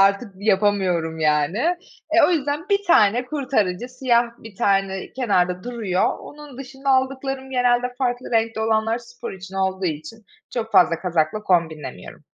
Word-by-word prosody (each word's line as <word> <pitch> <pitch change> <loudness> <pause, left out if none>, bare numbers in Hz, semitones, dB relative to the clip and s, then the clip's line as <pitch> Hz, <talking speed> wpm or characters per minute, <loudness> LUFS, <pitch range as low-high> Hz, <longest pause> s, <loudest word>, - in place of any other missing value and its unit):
artık 200 +3 +3
yapamıyorum, 190 -5 +1
yani. 150 +4 +2 0.5
E, 335 +1 +5
o - - +1
yüzden 300 +2 -1
1 400 0 +1
tane 240 - +4
kurtarıcı, 245 -8 -1
siyah 250 -2 +2
1 220 -3 -12
tane 195 -1 0
kenarda 180 -7 0
duruyor. 220 -7 -1
Onun 295 -3 -12
dışında 270 +1 -4
aldıklarım 265 0 0
genelde 250 -1 +1
farklı 250 -1 -2
renkte 225 -1 +1
olanlar 220 +1 +1
spor 240 0 -9
için 190 0 -10
olduğu 190 0 -1
için 160 +8 -6 0.3
çok 225 -2 -3
fazla 165 -1 +5
kazakla 175 +3 0
kombinlemiyorum. 160 - -2
225 Hz, 140 wpm, -22 LUFS, 190-255 Hz, 0.5 s, E